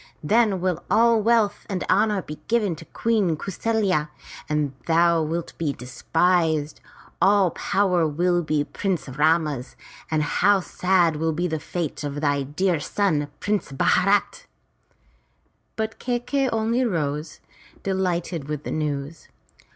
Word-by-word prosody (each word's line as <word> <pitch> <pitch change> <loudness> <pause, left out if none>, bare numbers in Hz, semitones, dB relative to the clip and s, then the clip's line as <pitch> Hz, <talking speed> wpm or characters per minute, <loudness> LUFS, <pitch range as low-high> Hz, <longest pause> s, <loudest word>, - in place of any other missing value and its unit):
Then 210 +1 +2
will 180 -2 -1
all 230 +1 +4
wealth 225 -2 +2
and 190 -2 -2
honor 205 -1 +2
be 150 0 -8
given 215 -6 +1
to 165 - -11
Queen 205 -8 0
Kau 195 - -5
saFya, 190 -7 0 0.4
and 150 -2 0
thou 170 0 +4
wilt 165 +2 -3
be 155 -4 0
despised. 160 +4 0 0.4
All 195 -1 +4
power 180 -4 +1
will 175 +3 +1
be 155 -2 0
Prince 185 +1 -3
Rama's, 150 -1 0 0.3
and 155 -1 +1
how 205 +6 +3
sad 180 -3 +1
will 160 +1 0
be 175 +3 -1
the 160 -2 -2
fate 160 -3 -4
of 145 0 -4
thy 145 -2 +1
dear 160 +5 0
son. 150 -2 0
Prince 205 -6 -1
Bharat!" 195 +8 +1 1.3
But 220 0 -3
Kai 245 -1 -1
key'i 270 +2 -1
only 225 +3 +1
rose, 150 - -2 0.4
delighted 175 -5 -2
with 150 -1 -4
the - - -5
news. 150 0 -3
170 Hz, 135 wpm, -24 LUFS, 150-200 Hz, 1.3 s, all